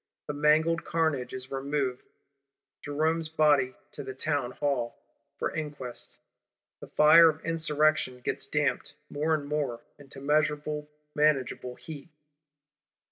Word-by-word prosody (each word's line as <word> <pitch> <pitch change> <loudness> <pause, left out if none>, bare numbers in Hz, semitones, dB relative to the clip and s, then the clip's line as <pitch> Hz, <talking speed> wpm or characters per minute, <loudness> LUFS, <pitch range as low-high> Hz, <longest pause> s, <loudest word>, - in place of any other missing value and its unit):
The 150 - -4
mangled 155 +3 +3
carnage 155 -7 0
is 130 0 -7
removed; 135 -1 -2 0.7
Jerome's 155 +2 0
body 145 -5 +3 0.2
to - - -7
the 130 - -7
Townhall, 135 -3 -1 0.4
for - - -2
inquest: 145 -6 -6 0.6
the - - -10
fire 165 +2 +7
of 155 0 -5
Insurrection 155 -5 +1
gets - - -3
damped, 150 -1 -1 0.2
more 155 +2 +1
and 145 -2 -4
more, 145 -5 -2 0.2
into 140 -1 -11
measurable, 150 +1 0 0.2
manageable 135 -4 +1
heat. 155 -1 -10
150 Hz, 115 wpm, -28 LUFS, 135-155 Hz, 0.7 s, fire